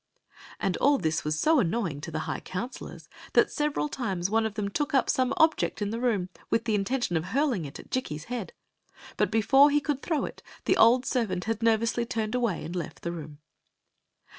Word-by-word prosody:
" - - -20 0.2
And 185 - 0
all 285 +1 +4
this 160 -8 -1
was 150 0 -1
so 310 - +4
annoying 170 - -1
to 160 - -6
the 155 -1 -3
high - - -3
counsel 205 +8 -6
ors - - -12 0.3
that - - +4
several 300 0 0
times 195 -10 -2
one 225 0 +2
of 210 - -9
them 205 -1 -1
took 285 +8 -1
up 265 - +3
some 255 -1 +1
object 320 0 +2
in 205 -1 -2
the 230 - -3
room 215 -7 0 0.2
with 225 0 +1
the 225 - 0
intention 210 -1 0
of 160 - -2
hurling 240 - 0
it 140 - -8
at - - -13
Jikki's 155 -12 -2
head; 245 - -5 0.6
but - - +1
before 245 +6 +5
he 295 +1 +3
could 280 -1 -2
throw 320 -4 0
it - - -9 0.2
the - - +3
old 245 +3 +5
servant 225 -8 -1
had 225 0 -2
nervously 230 +1 +2
turned 220 -2 -2
away 235 -7 0
and 170 - -6
left 175 - -5
th^ 170 - -2
room. 155 -2 -8
225 Hz, 215 wpm, -28 LUFS, 180-260 Hz, 0.6 s, before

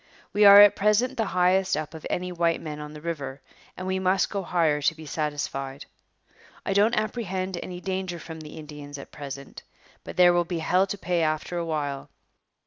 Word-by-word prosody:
We 205 0 +5
are 200 0 +11
at 205 -1 +8
present 210 +6 +2
the 225 -3 -1
highest 185 -1 +3
up 155 0 -5
of 160 - -7
any 180 0 -2
white 170 -1 +1
men 150 -2 -6
on 150 0 -8
the 150 - -10
river, 145 -5 -5 0.4
and 185 - -5
we 190 0 -1
must 190 +1 +1
go 200 - -2
higher 165 -5 +1
to 160 +2 +2
be 160 0 -11
satisfied. 145 -2 -4 0.8
I 195 - 0
don't 210 +4 +3
apprehend 190 -4 -2
any 180 -1 -7
danger 185 -2 -3
from 160 0 -9
the 155 0 -10
Indians 145 -2 -9
at 140 - -11
present, 140 -1 -8 0.4
but - - -9
there 175 -1 +7
will 175 0 +3
be 175 0 -4
hell 180 +4 +2
to 205 - -4
pay 175 -2 -1
after 155 +2 -1
a 170 - -2
while. 145 -3 -3
170 Hz, 200 wpm, -26 LUFS, 150-190 Hz, 0.8 s, are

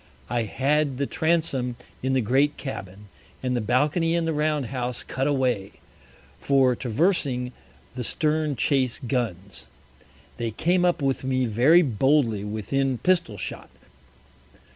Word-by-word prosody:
I 120 -2 0
had 140 +4 0
the 140 - 0
Transome 155 -7 0 0.3
in 130 +1 0
the 130 - +3
great 135 +6 +2
Cabin, 100 -6 -7 0.4
and 125 -1 0
the 120 - 0
Balcony 150 - +1
in 170 -1 +1
the 165 - 0
Round 150 -2 0
house 125 -2 -3
cut 135 +2 -2
away, 125 -8 0 0.7
for 135 -2 +3
traversing 125 - 0 0.4
the 125 -1 -4
Stern 155 +2 0
Chase 130 -1 +1
Guns. 105 -7 -3 0.7
They 120 -1 -2
came 175 - +1
up 175 -5 +1
with 135 -1 0
me 130 -1 +1
very 130 +11 +5
boldly 130 -4 +2
within 120 +6 -1
Pistol 175 - +1
shot. - - -6
130 Hz, 135 wpm, -25 LUFS, 120-150 Hz, 0.7 s, very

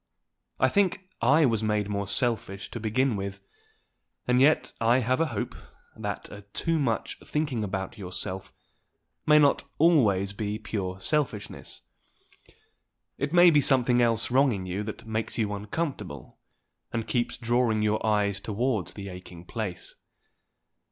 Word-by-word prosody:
I - - +5
think 190 -2 +1
I 145 +7 +5
was 115 -4 +2
made 105 -2 0
more 100 -1 -2
selfish 105 -4 -2
to 120 - -5
begin 115 +3 +1
with; 100 0 -4 0.9
and 125 +1 +4
yet 150 +3 +3
I 115 +2 +4
have 130 +2 +1
a 165 - +2
hope 110 -8 -3 0.4
that 105 -2 -5
a 100 - -9
too 160 - -1
much 120 -6 -1
thinking 150 -7 -1
about 95 0 -4
yourself 95 0 -5 0.8
may 150 0 +7
not 145 -2 +4
always 105 - +4
be 105 +1 -3
pure 95 -4 -4
selfishness. 120 -5 -3 1.4
It 140 +2 -1
may 175 0 +7
be 150 -2 +5
something 125 -3 +3
else 115 -1 +1
wrong 135 +1 +4
in 95 -2 -4
you 95 +2 -3
that 110 - -7
makes 110 0 -3
you 105 -3 0
uncomfortable, 105 - -5 0.5
and 115 -2 -2
keeps 120 -1 -1
drawing 120 -2 +1
your 105 0 +1
eyes 105 -2 +1
towards 110 0 -1
the 100 -1 -7
aching 90 -2 -10
place. 105 -4 -5
110 Hz, 145 wpm, -27 LUFS, 100-130 Hz, 1.4 s, may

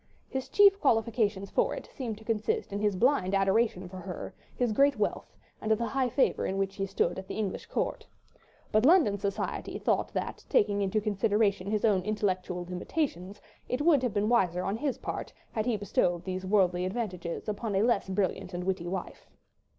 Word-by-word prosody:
His 265 -1 -4
chief 400 -1 +6
qualifications 220 - +1
for - - +1
it - - -8
seemed 235 -6 -4
to 220 - -14
consist 225 - -1
in 200 - -2
his 205 -2 +1
blind 200 -4 +2
adoration 195 -1 +2
for 185 +1 -9
her, 185 -1 -6 0.2
his 245 -3 +1
great 280 +6 +3
wealth, - - -2 0.2
and 215 - -3
the 225 +2 +2
high 260 0 0
favour 265 - +2
in 190 - -2
which 195 0 -1
he 195 -1 -1
stood 185 -1 0
at 190 - -9
the - - -5
English 205 -3 -3
court; - - -2 0.6
but 215 0 +3
London 285 - +5
society 200 0 -3
thought - - 0
that, - - -3
taking 205 - +3
into 200 +2 +1
consideration 205 -1 +1
his 215 +1 +1
own 200 -4 +3
intellectual 185 -3 -2
limitations, 190 - -3 0.3
it 255 - -1
would 305 -5 +5
have 245 -5 -1
been 205 +1 +2
wiser 185 -7 +2
on 195 - -1
his 275 0 -1
part - - -5 0.2
had 220 +1 -2
he 235 -3 +1
bestowed 175 -3 0
those 185 0 -4
worldly 185 -3 +3
advantages 185 -4 -4
upon 210 0 -2
a 195 - +3
less 230 -5 +1
brilliant 190 -1 -1
and 180 - -3
witty 185 -2 -2
wife. 185 0 -5
205 Hz, 190 wpm, -29 LUFS, 190-235 Hz, 0.6 s, chief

